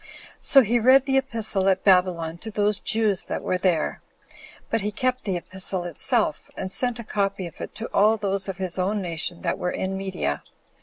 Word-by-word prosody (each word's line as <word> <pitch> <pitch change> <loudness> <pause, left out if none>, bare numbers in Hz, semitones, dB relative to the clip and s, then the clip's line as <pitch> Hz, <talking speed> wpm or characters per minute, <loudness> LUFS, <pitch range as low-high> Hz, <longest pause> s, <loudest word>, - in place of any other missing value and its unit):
So 270 -2 +7
he 240 +2 +1
read 260 +3 +5
the 270 -1 +3
epistle 220 -7 0
at 190 0 +1
Babylon 180 -4 +2
to 220 - -7
those 205 -1 +1
Jews 215 -4 +1
that - - -4
were 185 - -1
there; 175 -5 0 0.7
but 225 - +1
he 210 +1 -2
kept 255 +4 -1
the 190 -3 -1
epistle 185 +1 -3
itself, 170 -3 0
and 190 - -5
sent 245 +3 +2
a 235 - -7
copy 200 -3 -2
of 170 - -10
it - - -7
to 225 - -4
all 215 +2 +4
those 195 -1 0
of 190 - -5
his 185 -1 -3
own 200 +3 0
nation 170 -2 -2
that - - -1
were 180 - -1
in 190 +1 -3
Media. 190 - -3
195 Hz, 200 wpm, -24 LUFS, 185-220 Hz, 0.7 s, So